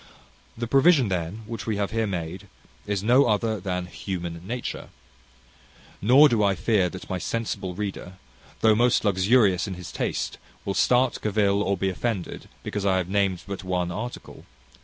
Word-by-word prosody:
The 120 Hz, -, -2 dB
provision, 135 Hz, -, +4 dB
then, 90 Hz, +4 st, -3 dB
which 115 Hz, 0 st, -6 dB
we 110 Hz, -2 st, 0 dB
have 100 Hz, -1 st, -1 dB
here 115 Hz, -1 st, 0 dB
made 90 Hz, -1 st, -5 dB, 0.4 s
is 100 Hz, -2 st, -1 dB
no 125 Hz, +5 st, +5 dB
other 110 Hz, 0 st, +1 dB
than 90 Hz, -1 st, -3 dB
Human 85 Hz, -1 st, -5 dB
Nature. 125 Hz, +2 st, -5 dB, 1.1 s
Nor 130 Hz, +8 st, +7 dB
do 115 Hz, -6 st, +1 dB
I 100 Hz, -1 st, +3 dB
fear 95 Hz, 0 st, +2 dB
that 95 Hz, -, -9 dB
my 95 Hz, -, -3 dB
sensible 100 Hz, -4 st, -3 dB
reader, 100 Hz, -2 st, -5 dB, 0.5 s
though 110 Hz, -1 st, +6 dB
most 120 Hz, +1 st, +3 dB
luxurious 100 Hz, 0 st, +3 dB
in 95 Hz, -, -4 dB
his 90 Hz, -1 st, -8 dB
taste, -, -, -3 dB, 0.3 s
will 100 Hz, -, -1 dB
start, 125 Hz, +4 st, +2 dB
cavil, 100 Hz, -1 st, +2 dB
or 100 Hz, -1 st, 0 dB
be 95 Hz, +1 st, 0 dB
offended, 100 Hz, -1 st, -4 dB
because 105 Hz, -, -3 dB
I 95 Hz, -2 st, +2 dB
have 90 Hz, -1 st, -2 dB
named 95 Hz, -2 st, 0 dB
but 100 Hz, -1 st, -6 dB
one 90 Hz, -1 st, -1 dB
article. 115 Hz, +7 st, -7 dB
100 Hz, 165 wpm, -25 LUFS, 95-115 Hz, 1.1 s, Nor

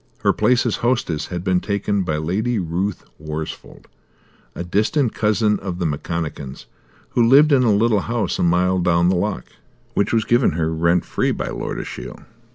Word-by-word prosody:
Her -, -, +4 dB
place 120 Hz, +3 st, +2 dB
as -, -, 0 dB
hostess 115 Hz, -11 st, -1 dB
had 90 Hz, -1 st, -5 dB
been 95 Hz, -1 st, +2 dB
taken 100 Hz, 0 st, -1 dB
by 80 Hz, -4 st, -1 dB
Lady 105 Hz, +10 st, -1 dB
Ruth 90 Hz, +2 st, -2 dB, 0.2 s
Worsfold, 75 Hz, 0 st, -7 dB, 0.7 s
a -, -, -4 dB
distant 110 Hz, -, +1 dB
cousin 105 Hz, -1 st, +1 dB
of 95 Hz, -2 st, -5 dB
the 90 Hz, -, -2 dB
McConachans, 75 Hz, -2 st, -4 dB, 0.4 s
who 120 Hz, -, +1 dB
lived 140 Hz, +6 st, +6 dB
in 135 Hz, -2 st, +5 dB
a 120 Hz, -3 st, +3 dB
little 105 Hz, +1 st, +3 dB
house 110 Hz, -2 st, -2 dB
a -, -, +1 dB
mile 90 Hz, +2 st, +2 dB
down 85 Hz, 0 st, +2 dB
the 95 Hz, -, +2 dB
loch, 95 Hz, -6 st, -2 dB, 0.5 s
which 100 Hz, +2 st, 0 dB
was 110 Hz, -2 st, +1 dB
given 120 Hz, -, +3 dB
her 80 Hz, 0 st, -1 dB
rent 85 Hz, +2 st, +1 dB
free -, -, -1 dB
by -, -, -2 dB
Lord -, -, -4 dB
Ashiel. -, -, -8 dB
95 Hz, 175 wpm, -21 LUFS, 85-110 Hz, 0.7 s, lived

